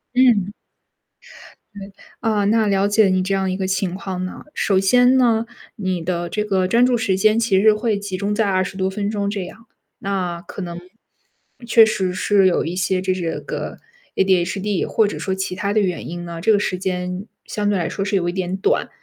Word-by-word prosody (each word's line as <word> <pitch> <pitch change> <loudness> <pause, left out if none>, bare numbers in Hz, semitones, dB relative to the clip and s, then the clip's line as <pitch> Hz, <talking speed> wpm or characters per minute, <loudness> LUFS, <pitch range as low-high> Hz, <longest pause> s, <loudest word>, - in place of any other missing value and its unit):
嗯。 215 -6 +3 1.2
对。 200 -1 -9 0.3
呃， 210 -3 +1
那 220 0 +3
了 195 0 +2
解 205 -1 +4
你 185 0 +2
这 190 +2 -1
样 190 -1 0
一 185 - -2
个 190 -1 -2
情 190 -1 -1
况 185 -1 -5
呐。 185 - -8
首 190 -2 +1
先 245 +6 +4
呢， 230 -2 +3 0.3
你 185 -4 -2
的 175 0 -2
这 210 - -1
个 190 -3 0
专 235 +5 +4
注 250 -1 +2
时 200 -5 0
间 215 +3 +3
其 210 -5 +2
实 215 0 +6
会 215 -1 -1
集 200 -2 -5
中 200 +2 -1
在 220 0 +1
20 185 0 -1
多 190 0 0
分 200 +1 -3
钟 200 -2 -1
这 205 -1 -3
样， 225 +5 -13 0.3
那 185 -3 -3
可 200 - -9
能 175 -1 -6 0.9
确 225 -1 +7
实 190 -4 -1
是 195 +1 +3
有 175 - +1
一 170 - -3
些 185 0 0
就 185 0 0
这 170 -3 -3
个 - - -5 0.4
ADHD 190 +1 +1
或 220 -2 +2
者 - - -5
说 190 - -2
其 190 -1 -3
他 200 +2 -2
的 215 - +3
原 180 -3 -2
因 175 0 -6
呢， 170 -1 -7
这 220 - +3
个 205 - +3
时 185 -3 -1
间 180 +1 -3 0.2
相 205 -1 -2
对 205 - +1
来 170 - -1
说 195 - -3
是 205 0 -1
有 175 -2 +1
一 - - -1
点 185 0 -2
短。 195 - 0
195 Hz, 235 characters per minute, -20 LUFS, 185-210 Hz, 1.2 s, 确